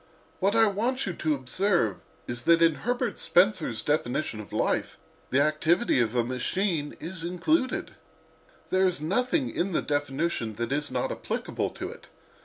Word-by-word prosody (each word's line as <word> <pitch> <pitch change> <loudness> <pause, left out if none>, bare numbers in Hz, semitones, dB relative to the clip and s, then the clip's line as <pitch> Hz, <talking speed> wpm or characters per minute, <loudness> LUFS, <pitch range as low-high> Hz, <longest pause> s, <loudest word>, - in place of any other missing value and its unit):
What 195 +3 +2
I 225 0 +6
want 230 +6 0
you 190 - -2
to 155 -2 0
observe 135 - 0 0.3
is 120 0 -4
that 170 0 +5
in 165 -1 +5
Herbert 245 - -2
Spencer's 180 - +2
definition 145 -5 -1
of 105 - -9
'life' - - 0 0.3
the 130 - +2
activity 155 - +2
of 115 0 +1
a 120 - +3
machine 145 - -1
is 165 +1 -6
included—there 185 - -2
is 180 - +2
nothing 250 - 0
in 185 +1 -1
the - - +2
definition 145 -5 -1
that 120 +3 -3
is 145 +1 0
not - - -1
applicable - - -3
to - - -4
it. - - -13
170 Hz, 155 wpm, -27 LUFS, 140-195 Hz, 0.3 s, I